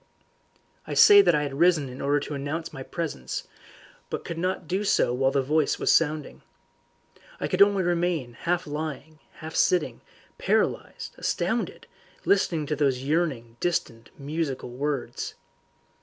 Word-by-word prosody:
I - - -4
say 410 -1 +9
that 175 - +3
I 150 - +1
had 140 -2 -4
risen 170 -5 +4
in 125 +1 -8
order 145 +1 +2
to 150 - -5
announce 145 +4 -4
my 135 - -7
presence, 140 - -5 0.6
but - - -3
I - - -22
could 165 -1 -5
not 185 -1 -2
do 190 +5 -1
so 160 -10 +2
while 135 +1 +2
the 135 0 +1
voice 150 +2 +1
was - - +2
sounding. 155 -2 0 1.0
I - - -1
could 185 - 0
only 200 -1 +5
remain 170 -7 0
half 175 +8 -1
lying, 155 0 -6
half 160 +1 -9
sitting, 150 -10 +1 0.4
paralysed, - - -1
astounded, - - -2 0.4
listening 175 -6 +2
to 150 - -2
those 135 -4 0
yearning 135 -7 -1
distant 120 -9 -2
musical 140 -3 -3
words. 140 +1 -3
150 Hz, 150 wpm, -26 LUFS, 135-170 Hz, 1.0 s, say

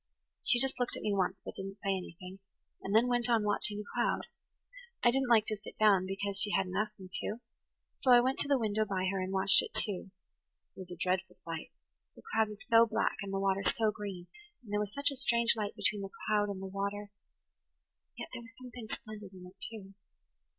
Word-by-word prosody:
She 245 - +5
just 265 +1 +2
looked 245 - -1
at - - -8
me 210 - 0
once, 190 -1 -1
but - - -6
didn't 195 +1 -7
say 195 -1 +1
anything, 185 +1 -8 0.4
and 195 +2 -2
then 225 +2 +6
went 245 0 +1
on 230 -3 +3
watching 205 0 -1
the 210 - -4
cloud. 240 - 0 0.8
I 240 - +6
didn't 265 0 0
like 220 -3 +5
to 215 - -2
sit 205 - -12
down 200 -4 +4
because 195 +1 -2
she 210 - +5
hadn't 190 -2 0
asked 210 0 -2
me 190 - -9
to, 215 - -4 0.6
so 260 - +1
I 245 - +9
went 260 +2 +1
to - - +4
the 280 -1 +3
window 215 -2 0
by 190 -3 -2
her 195 -1 -2
and 185 +1 -3
watched 195 0 +6
it, - - -8
too. 195 -2 0 0.7
It - - -13
was 185 -1 -8
a 175 - -7
dreadful 185 +1 -1
sight–the 165 -1 -11
cloud 220 0 +3
was 210 0 -9
so 230 0 +6
black 220 - 0
and 200 -1 -5
the 195 - -1
[Page - - -1
100] 195 0 +1
water - - +2
so 220 -2 +2
green, 200 -4 -7 0.4
and 210 -3 -9
there 205 - +2
was 210 -1 -2
such 280 +5 +1
a - - -5
strange 235 -3 +3
light 210 -2 -3
between 205 -1 0
the 195 - -5 0.2
cloud 210 -1 +2
and 195 -1 -5
the - - -4
water; 200 +1 -4 1.1
yet - - -6
there - - -6
was 230 -1 -15
something 245 -3 -9
splendid 210 -4 -8
in 180 -1 -11
it, 185 +2 -15
too. 200 -3 -3
205 Hz, 225 wpm, -32 LUFS, 195-230 Hz, 1.1 s, I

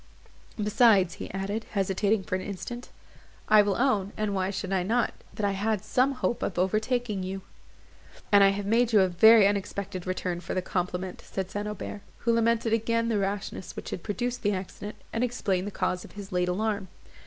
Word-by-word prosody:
Besides," 210 -4 +4 0.2
added 200 +3 -3
he, - - -23
hesitating 195 +1 +1
for - - -6
an 185 - 0
instant, 240 +6 -6 0.6
"I 215 -1 +7
will 205 -1 +1
own, 215 -6 +1
and 215 -1 -1
why 190 -1 0
should 195 0 -3
I 190 - +2
not? 230 +6 +1 0.2
that 210 - -1
I 200 - +2
had 205 +1 -1
some 255 +5 +2
hope 250 -2 -1
of 180 - -2
overtaking 215 +3 0
you." 190 +1 -5 0.9
"And 200 -1 +7
I 195 - +7
have 200 +1 -2
made 230 +3 +2
you 210 - +7
a 190 - +4
very 215 +4 +7
unexpected 200 -2 -3
return 180 -1 -2
for 175 - -5
the 185 - +1
compliment," 180 0 -3
said 190 -1 -5
St. 205 0 -3
Aubert, 210 0 -6 0.2
who 235 - +4
lamented 230 0 +2
again 230 +1 +1
the 215 -3 +1
rashness 195 -2 -3
which - - -7
had 175 - -4
produced 245 +5 -3
the 205 0 +1
accident, 195 +2 -6 0.2
and 230 - 0
explained 205 -6 -1
the - - -4
cause 185 -2 -1
of - - -13
his 205 -1 -9
late 180 0 +1
alarm. 200 +1 -1
205 Hz, 195 wpm, -27 LUFS, 190-220 Hz, 0.9 s, I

